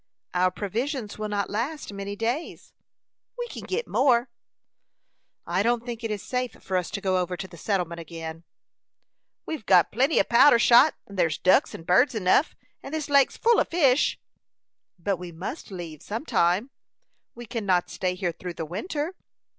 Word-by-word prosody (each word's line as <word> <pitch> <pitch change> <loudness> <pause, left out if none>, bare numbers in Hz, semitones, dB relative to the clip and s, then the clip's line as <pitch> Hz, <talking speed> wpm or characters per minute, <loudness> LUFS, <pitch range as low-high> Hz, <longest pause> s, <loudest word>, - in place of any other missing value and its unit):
"Our 180 +1 +3
provisions 215 - -4
will 215 0 -3
not 200 -1 -1
last 240 +3 -3
many 200 0 -5
days." 235 +9 -4 0.6
"We 485 - -3
kin - - -8
git 455 +5 -2
more." 250 -2 +3 1.2
"I 175 +3 0
don't 235 +2 +1
think 235 -1 -6
it 225 - -2
is 210 -2 -4
safe 250 -1 -2
for 190 - -5
us 180 -2 0
to 200 - -5
go 185 -1 +1
over 180 0 -2
to 190 - -6
the 175 - -14
settlement 170 -2 -2
again." 165 0 -8 1.0
"We've 315 -8 -5
got 180 -4 +4
plenty 275 +5 +2
o' - - +5
powder'n 240 +2 +6
shot, 240 +6 +6
and 200 -2 -9
thyers 160 -4 +2
ducks 185 - +3
and 165 - -10
birds 230 +9 +4
enough. 205 - +2 0.3
And 280 - -6
this 305 -2 -4
lake's 280 -1 +4
full 470 0 +4
of - - +1
fish." 290 -5 +3 0.8
"But 190 +2 -1
we 180 0 -8
must 180 - -7
leave 170 -6 -8
some 225 +8 -5
time. 185 - +1 0.6
We 240 0 -9
could 225 0 -4
not 180 -2 +1
stay 180 -1 -2
here 180 -1 -1
through 175 +1 -8
the 160 - -4
winter." 295 - -4
205 Hz, 180 wpm, -26 LUFS, 180-255 Hz, 1.2 s, powder'n